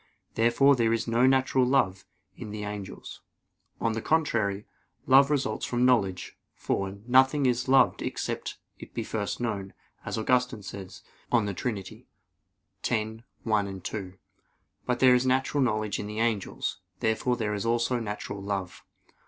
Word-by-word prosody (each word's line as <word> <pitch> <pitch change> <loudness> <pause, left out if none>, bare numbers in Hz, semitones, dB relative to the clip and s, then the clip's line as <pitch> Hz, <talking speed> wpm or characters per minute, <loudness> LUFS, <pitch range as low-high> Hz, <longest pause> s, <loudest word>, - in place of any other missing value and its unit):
Therefore 120 +5 +4
there 115 -2 +2
is 115 0 -1
no 120 +2 +3
natural 130 0 +3
love 105 -8 +1 0.3
in 110 - -8
the 105 0 -5
angels. 105 -1 -7 0.6
On 115 - +1
the 110 0 -3
contrary, 110 -11 0 0.4
Love 135 +1 +6
results 145 -3 -1
from 120 0 +1
knowledge; 100 -8 +1 0.2
for, 95 0 -2
nothing 130 +3 +4
is 125 0 +1
loved 135 +1 +4
except - - -4 0.2
it - - -12
be - - -2
first 105 -2 -3
known, 100 -5 -3 0.3
as - - -4
Augustine 125 -1 +1
says 95 -1 -9 0.3
(De 105 -5 +2
Trin. 110 +3 -2
x, 95 -1 -8 0.9
1,2). 105 -4 -3 0.7
But 125 -1 0
there 130 -1 +7
is 125 +1 +2
natural 130 +2 +1
knowledge 110 -4 0
in 105 - -4
the 105 +1 -5
angels. 115 -4 -1 0.2
Therefore 115 +3 0
there 105 -3 -1
is 100 - -2
also 120 +2 +1
natural 105 -2 -5
love. 95 -2 -4
115 Hz, 145 wpm, -27 LUFS, 105-125 Hz, 0.9 s, there